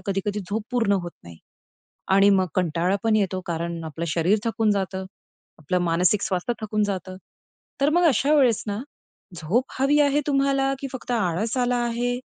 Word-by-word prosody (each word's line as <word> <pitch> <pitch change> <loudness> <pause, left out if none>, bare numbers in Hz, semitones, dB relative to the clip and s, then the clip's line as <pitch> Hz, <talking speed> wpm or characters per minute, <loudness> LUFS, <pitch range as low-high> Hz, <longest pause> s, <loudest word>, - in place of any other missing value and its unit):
कधी-कधी 205 +2 -2
झोप 215 +1 -1
पूर्ण 230 -5 +1
होत 175 -3 -1
नाही. 85 -1 -12 0.8
आणि 200 +1 +6
मग 190 -2 +3
कंटाळा 180 +2 +1
पण 225 -1 +3
येतो. 190 -3 0
कारण 170 0 -3
आपलं 160 +1 -5
शरीर 170 +7 +2
थकून 225 -1 +1
जातं, 190 -1 -2 0.5
आपलं 155 +4 -1
मानसिक 175 +4 +2
स्वास्थ्य 190 +5 -1
थकून 215 0 -1
जातं. 185 -2 -4 0.6
तर 285 +2 +3
मग 350 +2 +3
अशा 280 +4 +2
वेळेस 255 -7 +3
ना, 205 0 -3 0.6
झोप 180 +11 0
हवी 285 +3 +3
आहे 290 0 +3
तुम्हाला, 275 -1 +1
की 275 - -5
फक्त 255 -1 -7
आळस 215 +1 -1
आला 245 0 +1
आहे. 240 +1 -1
205 Hz, 165 wpm, -24 LUFS, 180-245 Hz, 0.8 s, आणि